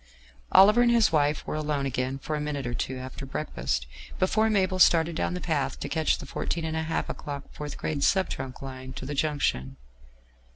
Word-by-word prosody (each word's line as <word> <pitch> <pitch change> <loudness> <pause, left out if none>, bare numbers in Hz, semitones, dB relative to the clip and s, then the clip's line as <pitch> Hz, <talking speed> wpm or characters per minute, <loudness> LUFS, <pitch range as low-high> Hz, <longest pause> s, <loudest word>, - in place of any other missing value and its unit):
Oliver 210 +5 +7
and 240 - +5
his 235 -4 +4
wife 150 -1 +1
were - - -4
alone 150 -2 -1
again 130 0 -1
for 155 +3 -4
a 150 - -2
minute 145 -3 -3
or 120 - -2
two 130 +2 -3
after 130 +1 -7
breakfast 65 - -2 0.3
before 215 +4 +2
Mabel 190 -3 +1
started 165 -2 +5
down 180 - -1
the - - -3
path 155 -6 -1
to - - -4
catch 160 -1 +1
the - - -8
14¹⁄₂ 160 -1 -2
o'clock 140 -1 -5
4th 150 -1 -6
grade 145 -2 -2
sub 190 -1 +3
trunk 130 0 -6
line 130 -1 -7
to 130 - -7
the 145 - -4
junction. 140 - -1
150 Hz, 190 wpm, -27 LUFS, 135-165 Hz, 0.3 s, Oliver